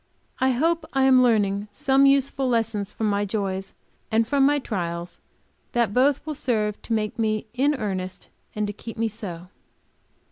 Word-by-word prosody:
I 260 - +3
hope 320 +6 +1
I 270 -1 +2
am 260 -1 +6
learning 205 -4 +2
some 270 +5 +3
useful 275 -1 +2
lessons 225 -4 -1
from 220 - -2
my 205 0 +1
joys 195 -2 -3 0.3
and 225 0 +2
from 280 0 +2
my 290 0 +3
trials, 175 -8 -4
and - - -41
that 235 -4 +1
both 270 +4 +2
will 310 - -3
serve 215 -7 -1
to 230 - -3
make 220 +1 -1
me 215 -1 0
in 280 +4 +2
earnest, 190 -6 -4 0.3
and 210 0 0
to 205 - -4
keep 230 +2 -9
me 225 0 +1
so. 185 -5 -7
225 Hz, 175 wpm, -24 LUFS, 205-265 Hz, 0.3 s, am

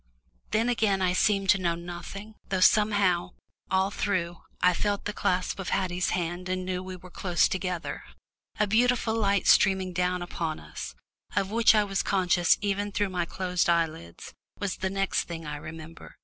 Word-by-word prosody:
Then 225 +2 +1
again 220 -5 +2
I 180 -1 +2
seemed 195 0 +3
to 195 - +2
know 170 -2 +1
nothing, 175 +5 -8 0.2
though 190 - 0
somehow, 195 -3 +3 0.4
all 190 +1 +2
through, 175 -5 -1 0.2
I 180 0 +4
felt 205 +2 -1
the 210 - -2
clasp 185 0 -1
of 190 - -4
Haddie's 180 -2 0
hand 175 +1 -2
and 185 0 -2
knew 180 -1 -2
we 185 0 -7
were 180 0 -13
close 175 -2 +2
together. 180 -3 -3 0.6
A 210 - +4
beautiful 230 +2 +2
light 200 -3 +1
streaming 190 -2 +4
down 180 0 0
upon 165 -3 -4
us, 75 - -8 0.4
of 195 0 0
which 225 0 +5
I 210 - +4
was 195 -1 -1
conscious 180 -3 +3
even 205 0 -1
through 205 0 0
my 180 -2 -1
closed 180 0 -1
eyelids, 160 - -2 0.2
was 200 -2 -3
the 190 - -2
next 195 0 0
thing 165 -2 -7
I 150 0 -5
remember. 160 +2 -10
185 Hz, 175 wpm, -27 LUFS, 175-200 Hz, 0.6 s, which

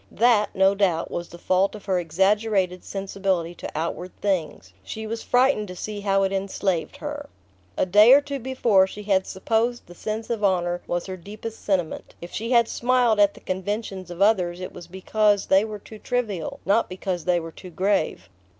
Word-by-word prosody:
That, 225 -2 +2
no 190 +1 +4
doubt, 185 -5 0
was 175 0 -4
the 170 - -11
fault 185 +4 +1
of 210 - -11
her 190 -3 +1
exaggerated 190 +2 +1
sensibility 195 -3 -2
to - - -7
outward 170 +3 -4
things: 160 - -2
she 220 - -6
was 225 +1 -4
frightened 250 -4 +2
to 180 - -8
see 210 +3 -5
how 195 -1 +2
it 195 - 0
enslaved 190 -3 -2
her. 290 -1 -6 0.5
A - - +2
day 210 +6 +7
or 275 - +9
two 285 -1 -5
before 235 -6 +3
she 210 +2 -9
had 195 -2 +1
supposed 225 +5 -1
the 175 - -13
sense 215 +5 -4
of 225 -3 -2
honour 175 -2 +1
was 175 0 -2
her 185 -1 -6
deepest 215 +5 -9
sentiment: 185 -5 -2
if 170 - -9
she 230 +2 -3
had 235 -2 +4
smiled 245 -3 +2
at 205 -1 +4
the - - -14
conventions 190 0 -4
of 175 +2 0
others 180 -5 +2
it 185 - -6
was 175 -1 -10
because 205 +3 +1
they 190 +1 +4
were 215 -1 -5
too 215 +2 -13
trivial, 210 -11 -3
not 205 +4 +2
because 185 -2 -4
they 180 -1 +2
were 165 0 -7
too 185 - -11
grave. 185 -1 0
195 Hz, 195 wpm, -24 LUFS, 180-220 Hz, 0.5 s, or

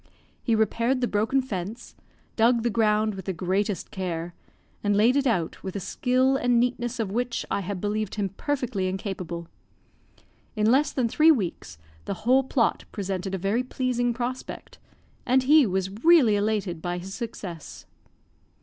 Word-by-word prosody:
He 230 - +1
repaired 230 +4 +1
the 245 - +1
broken 225 +6 +1
fence, 210 0 -6 0.4
dug 230 +1 +3
the 240 - +1
ground 215 -1 +2
with 190 -1 -8
the 190 - -2
greatest 190 +2 -1
care, 175 -2 -4 0.5
and 205 -1 +2
laid 230 +5 +4
it 280 -1 +2
out 175 -9 -1
with 190 0 -6
a - - -1
skill 255 +7 +1
and 245 -2 +2
neatness 245 0 -1
of 215 -4 -1
which 240 +2 -2
I - - +1
had 195 0 -4
believed 210 +1 -2
him 205 -2 -1
perfectly 240 -2 -2
incapable. 185 -3 -4 1.1
In 215 +1 +3
less 285 +4 +3
than 255 -3 0
three 310 +7 +4
weeks, 185 - 0 0.3
the 200 - -3
whole 260 +2 +5
plot 250 -3 0
presented 195 -1 -3
a - - -2
very 195 +6 0
pleasing 250 -1 -1
prospect, 245 +2 -5 0.4
and 260 0 +3
he 290 -1 +6
was 190 0 -1
really 315 -11 +6
elated 205 -5 -1
by 175 +1 -2
his 190 +2 -7
success. 200 -9 -7
215 Hz, 160 wpm, -26 LUFS, 190-245 Hz, 1.1 s, he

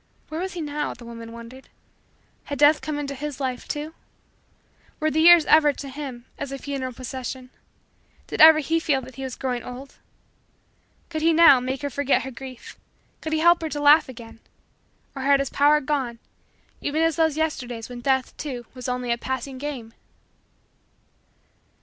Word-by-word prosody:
Where 315 +2 -4
was 380 +1 -4
he 350 - -5
now? 295 -1 -3
The 245 - -13
woman 230 -1 -9
wondered. 235 +3 -12 0.8
Had 285 - -5
Death 295 +1 +5
come 305 -1 -4
into 285 -1 -4
his 290 0 -6
life, 255 -2 -3
too? 300 +1 -4 1.1
Were 310 -1 +1
the 315 - 0
years 340 -1 +8
ever, 300 -2 +5
to 280 0 -8
him, 265 -3 -7
as 280 -1 -5
a 275 - -4
funeral 270 -2 -4
procession? 255 +1 -7 0.7
Did - - -2
ever 320 0 +10
he 320 +2 0
feel 285 -4 0
that 260 - -12
he 270 - -6
was 260 -2 -5
growing 250 -2 -3
old? 250 +3 -10 1.1
Could 315 -2 -4
he, 330 +1 +4
now, 320 -5 +7
make 260 +3 -4
her 285 - -1
forget 280 -3 +1
her 265 - -6
grief 255 0 -10 0.4
could 315 - -5
he 315 0 +1
help 345 +1 +5
her 320 - -3
to 295 - -4
laugh 290 0 +6
again 230 -2 -11 0.8
or 270 - -5
had 275 +1 +4
his 275 -1 -2
power 295 +1 +4
gone 265 -5 -2 0.6
even 310 +3 0
as 325 -2 +2
those 320 -1 +1
Yesterdays 245 -8 -3
when 245 -1 -9
Death, 265 0 0
too, 255 -5 -6
was 255 -1 -6
only 250 -1 -2
a 235 - 0
pleasing 260 +1 -4
game? 255 -6 -6
275 Hz, 180 wpm, -24 LUFS, 255-300 Hz, 1.1 s, ever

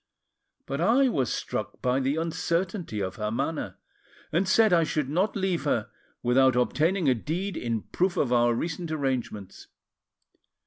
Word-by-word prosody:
But 140 +3 -3
I 250 +8 +4
was 130 - 0
struck - - -4
by 125 +1 +1
the 135 +2 0
uncertainty 170 - -2
of 95 0 -5
her 105 -1 -2
manner, 140 +7 -3 0.5
and 180 +4 +1
said 215 0 +5
I 170 -1 +5
should 150 -3 -1
not 185 +8 0
leave 190 -3 0
her - - 0 0.3
without 130 +1 +4
obtaining 160 +7 +1
a 130 - +5
deed 170 - -3
in 115 -3 -2
proof 180 0 -1
of 125 -3 +1
our 120 -1 +3
recent 165 +5 -3
arrangements. 130 -9 -3
155 Hz, 150 wpm, -27 LUFS, 125-180 Hz, 0.5 s, said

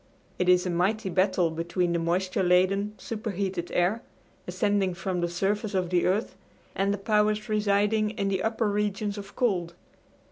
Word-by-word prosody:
It 180 0 +2
is 180 0 +5
a 180 - -1
mighty 190 +4 0
battle 185 -2 +2
between 170 +2 -1
the 170 - +1
moisture 185 +3 0
laden, 190 +3 +2
superheated 200 -5 -4
air, 185 +6 +1 0.5
ascending 205 -4 0
from 185 -1 -2
the 175 - 0
surface 200 +4 -1
of 180 -2 -1
the 175 -1 +2
earth, 200 +5 0 0.4
and 195 +1 0
the 205 - -1
powers 210 +1 +1
residing 210 0 +2
in 200 -2 -2
the 190 -1 0
upper 225 0 0
regions 205 0 -1
of 200 0 -11
cold. 180 -9 0
195 Hz, 165 wpm, -27 LUFS, 180-210 Hz, 0.5 s, is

